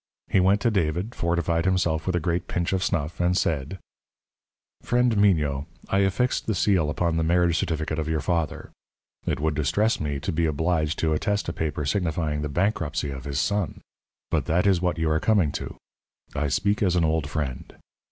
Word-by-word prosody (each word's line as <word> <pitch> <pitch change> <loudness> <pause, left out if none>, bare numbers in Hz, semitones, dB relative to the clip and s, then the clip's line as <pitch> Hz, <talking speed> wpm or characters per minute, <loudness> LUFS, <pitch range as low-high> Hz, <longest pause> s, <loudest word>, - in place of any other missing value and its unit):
He - - +4
went 95 +3 +3
to 120 - +2
David, 90 +3 -1
fortified 85 -2 0
himself 85 -4 +1
with 90 - +1
a - - +2
great 85 +1 -1
pinch 85 +1 -1
of 95 0 0
snuff, 85 -4 -2
and 90 +1 +2
said: 80 0 -1 1.0
"Friend 120 -1 +2
Mignot, 75 -9 +2 0.2
I 95 - +2
affixed 100 +6 +1
the 110 - 0
seal 95 -7 +2
upon 85 +2 0
the 80 - +1
marriage 85 0 +2
certificate 80 -1 -2
of 80 - -2
your 80 -1 +1
father. 85 0 -2 0.6
It - - 0
would 80 +1 0
distress 100 +10 +1
me 75 -2 -2
to - - -2
be 80 +1 +1
obliged 80 0 0
to 80 -1 +1
attest 100 +4 -1
a - - -3
paper 75 -2 -2
signifying 80 -2 -1
the 75 - -3
bankruptcy 85 -4 -1
of 65 -2 -7
his 70 -1 -2
son. 100 -3 -1 0.5
But - - +1
that 90 +4 +1
is 95 -3 +3
what 90 -3 0
you 80 0 0
are 80 - +2
coming 100 -8 +2
to. - - -5 0.6
I 75 0 0
speak 100 +9 0
as 90 -3 +2
an 85 - +3
old 80 -2 0
friend. 70 -5 -4
85 Hz, 190 wpm, -25 LUFS, 75-95 Hz, 1.0 s, He